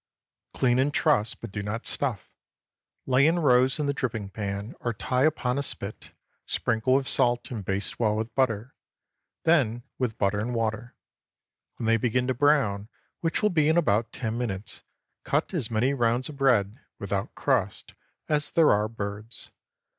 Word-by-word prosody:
Clean 125 -1 +2
and 140 +3 +2
truss, 115 -8 +2
but - - -9
do 100 - -4
not 105 +4 -4
stuff. 125 -9 -2 0.7
Lay 130 +2 +4
in 165 +2 +2
rows 130 -5 +3
in 150 - -1
the 140 - 0
dripping 110 -7 -3
pan, 100 +2 -4
or 120 - -2
tie 125 +5 +1
upon 140 -4 0
a - - 0
spit, 110 -6 -5 0.4
sprinkle 115 +3 +1
with 135 -1 +1
salt, 120 +1 +1
and 110 -5 -4
baste 95 +1 -3
well 110 -3 +2
with 110 +2 -3
butter, 120 -2 0 0.7
then 125 -8 +2 0.2
with 125 -4 -1
butter 100 +1 +1
and 120 +3 -2
water. 115 +1 -2 0.8
When 115 - -5
they 115 0 +4
begin 125 +2 0
to 130 - 0
brown, 125 -7 +2 0.3
which 165 +5 -1
will 210 - +3
be 155 -3 +3
in 160 - +3
about 115 -9 +2
ten 115 0 -3
minutes, 105 -4 -4 0.4
cut 150 +7 -1
as 145 -11 -1
many 120 +5 +1
rounds 120 0 0
of 150 - -8
bread 120 -5 +2 0.2
(without 100 0 -3
crust) - - -1 0.3
as 150 -1 +1
there 165 -2 +4
are 105 +1 +2
birds. 105 +1 -7
120 Hz, 170 wpm, -26 LUFS, 105-135 Hz, 0.8 s, Lay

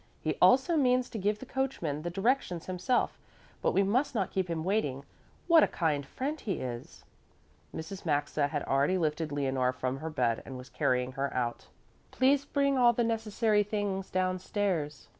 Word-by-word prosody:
He - - -1
also 270 +7 +5
means 250 -3 +2
to 220 - -4
give 205 +2 +1
the 260 - -9
coachman 255 - -2
the 175 - -3
directions 195 -2 0
himself, 185 +8 0 0.4
but - - +2
we 195 - +3
must 250 +7 +1
not 195 -5 0
keep 190 -2 -1
him 165 -1 -2
waiting. 145 -9 -1 0.4
What 335 -2 +7
a - - +5
kind 155 -4 0
friend 290 - -3
he 200 - -2
is!" 120 -2 -6 0.7
Mrs. 170 +4 -7
Maxa 145 -2 0
had 145 -1 -3
already 140 +7 +2
lifted 155 -2 -1
Leonore 130 -3 0
from 130 +1 -2
her 160 +3 -5
bed 125 -7 0
and 130 - -8
was 125 0 -10
carrying 125 0 0
her 135 +1 -2
out. 120 -2 -2 0.4
"Please 275 +2 +2
bring 280 -2 +1
all 240 -1 +6
the 240 - +1
necessary 220 -1 +1
things 200 -2 -2
downstairs. 185 - -1
185 Hz, 175 wpm, -30 LUFS, 145-230 Hz, 0.7 s, What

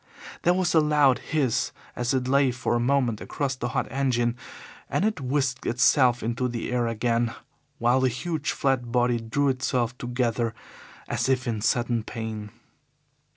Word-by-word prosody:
There 175 +1 +3
was 185 -1 +1
a 160 - +6
loud 150 -4 +4
hiss 140 -7 0 0.2
as 120 -1 -1
it 130 -1 0
lay 140 0 +4
for 120 -1 -2
a 120 - +2
moment 120 -3 +1
across 135 -2 -2
the 125 - -3
hot 130 +2 -1
engine, 120 -3 +1 0.5
and 195 - +1
it 215 -8 -1
whisked 130 0 -1
itself 120 0 +3
into 120 +3 -1
the 120 0 -4
air 120 -1 +1
again, 115 0 0 0.4
while 120 -1 +3
the 130 - +3
huge, 155 +5 -3
flat 130 -3 0
body 120 -1 +2
drew 135 +5 0
itself 125 -2 0
together 120 -2 -1 0.5
as - - -1
if 130 -1 +1
in 110 -3 -2
sudden 120 +1 +1
pain. 110 -2 -5
125 Hz, 160 wpm, -26 LUFS, 120-135 Hz, 0.5 s, a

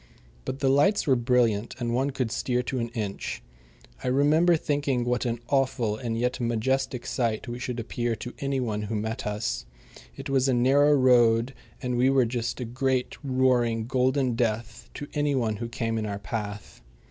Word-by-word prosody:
But 130 - -4
the 135 - +2
lights 170 +10 +3
were 135 - +4
brilliant, 120 -3 +1
and 120 -2 -2
one 135 +3 +1
could 130 -4 -2
steer 125 0 0
to 130 +1 -3
an 115 0 -2
inch. 105 -3 -4 0.6
I - - -3
remember 150 +6 +4
thinking 145 -5 0
what 125 +1 0
an 120 0 -2
awful 130 -6 +1
and 115 0 -3
yet 125 +2 -1
majestic 120 +2 -1
sight 115 -1 -1
we 120 +1 -5
should 125 -1 -4
appear 120 0 -2
to 120 +3 -7
any 140 -1 -1
one 110 -4 -2
who 105 +1 -3
met 110 +3 -3
us. 105 - -3 0.5
It 135 +1 -7
was 135 -1 +2
a 130 - +3
narrow 140 +4 +4
road, 120 -2 +4 0.3
and 125 -1 -1
we 125 +2 +4
were 135 -2 +4
just 120 +1 -3
a 125 - -3
great, 130 +1 -1
roaring, 125 -4 +2
golden 130 +1 +1
death 115 -1 -2
to 145 - -5
any 145 -1 +1
one 110 -5 0
who 115 +2 -5
came 115 -2 -2
in 110 - -3
our 100 -1 -3
path. 105 - -6
125 Hz, 185 wpm, -26 LUFS, 115-130 Hz, 0.6 s, were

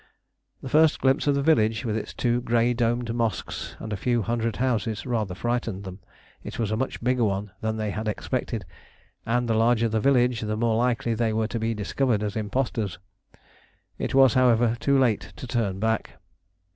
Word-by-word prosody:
The 130 - -5
first 155 +2 +4
glimpse 135 +2 +2
of 145 - +3
the 140 - 0
village 110 -8 +2
with 110 -2 -1
its 110 - -4
two 120 0 0
grey 120 0 +2
domed 120 0 0
mosques 115 -2 -3
and 110 -1 -6
a - - 0
few 120 +3 0
hundred 115 0 -1
houses 115 -4 -1
rather 110 -7 -2
frightened 120 -2 -2
them: 95 0 -8 0.4
it - - -7
was 110 -3 -1
a - - +1
much 130 +1 -3
bigger 125 0 +2
one 100 -1 -1
than 110 0 -1
they 110 -1 -2
had 110 +2 -4
expected, 115 -1 -3 0.6
and 120 +1 +1
the 115 - +1
larger 115 +1 +3
the 110 0 0
village 125 -2 +3
the 105 0 -2
more 115 0 +1
likely 120 0 +1
they 115 -1 0
were 110 0 0
to 115 - -3
be 115 +1 -1
discovered 105 +1 0
as 105 -1 -3
impostors. 110 -2 -2 1.0
It - - -2
was, 135 -3 +6
however, 120 -2 +3
too 140 -1 +2
late 120 -6 +1
to - - -8
turn 115 -6 -1
back. 110 +1 -1
115 Hz, 190 wpm, -25 LUFS, 110-125 Hz, 1.0 s, was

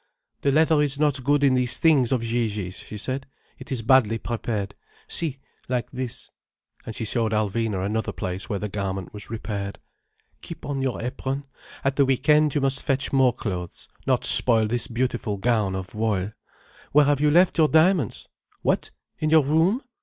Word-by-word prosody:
"The 140 - +2
leather 155 +1 +4
is 145 -2 +1
not 145 -3 +1
good 145 +2 +2
in 135 -2 +4
these 125 -1 +1
things 145 -7 +3
of 125 -3 +1
Gigi's," 110 -5 -2
she 105 - -9
said. 130 +5 -4 0.3
"It 140 +2 -11
is 120 -4 -2
badly 115 -3 +4
prepared. 110 -3 -3 0.3
See, 155 -5 -2 0.3
like 125 -2 -2
this." 130 -2 -6 0.6
And 110 - -5
she 115 - -3
showed 110 0 0
Alvina 105 -2 -1
another 110 +2 -2
place 90 0 -5
where 100 - -1
the 105 - -3
garment 95 -2 -4
was 105 0 -9
repaired. 100 -3 -5 0.6
"Keep - - -9
on 140 -1 -3
your 130 -2 -2
apron. 135 +2 -4 0.4
At 135 0 0
the 140 - +5
week 135 +2 -1
end 150 -1 +4
you 145 - +2
must 135 0 +1
fetch 135 -1 0
more 130 -2 +4
clothes, 90 -7 -6 0.2
not - - +2
spoil 115 -3 +6
this 120 +3 -1
beautiful 120 -3 -2
gown 105 -2 +1
of 95 0 -6
voile. 105 -3 -1 0.6
Where 150 0 +6
have 145 0 +1
you 150 - +4
left 170 +2 +4
your 155 - +6
diamonds? 160 - +2 0.4
What? - - 0 0.3
In 155 - 0
your 160 -1 +5
room? 165 - +2
125 Hz, 180 wpm, -24 LUFS, 105-140 Hz, 0.6 s, spoil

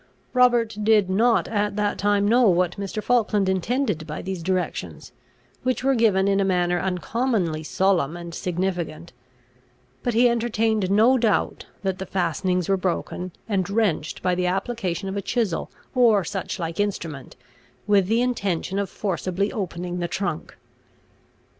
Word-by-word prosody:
Robert 240 -4 +3
did 210 -3 +3
not 230 +5 +3
at 205 -2 -1
that 205 -1 -1
time 205 0 +2
know 235 0 +5
what 180 -1 +2
Mr. 200 +2 -4
Falkland 215 -5 +2
intended 190 - 0
by 150 - -5
these 190 -2 -4
directions, 185 +1 -3 0.5
which 255 0 -1
were 270 +1 +3
given 210 -5 +3
in 200 0 +2
a - - +3
manner 180 -2 +1
uncommonly 185 -1 -1
solemn 175 -2 +1
and 170 -1 -8
significant; 175 -3 -3 0.9
but 245 -2 -1
he 245 +2 +6
entertained 225 -4 +1
no 225 +6 +4
doubt, 225 -3 0 0.2
that 190 -1 -1
the 190 - -5
fastenings 180 0 0
were 195 - +2
broken 185 0 -3 0.2
and 195 -4 0
wrenched 200 -8 0
by 180 -1 +2
the 180 0 0
application 195 -1 -2
of 190 - -4
a - - -1
chisel 215 -5 -1 0.2
or 230 -6 +4
such 190 +3 -4
like 165 -1 -4
instrument, 165 -9 -3 0.5
with 200 -3 +3
the 230 +3 +2
intention 200 -6 -1
of 200 -2 -2
forcibly 190 0 -2
opening 180 -3 -4
the 175 - -1
trunk. 175 -4 -4
195 Hz, 150 wpm, -24 LUFS, 180-220 Hz, 0.9 s, he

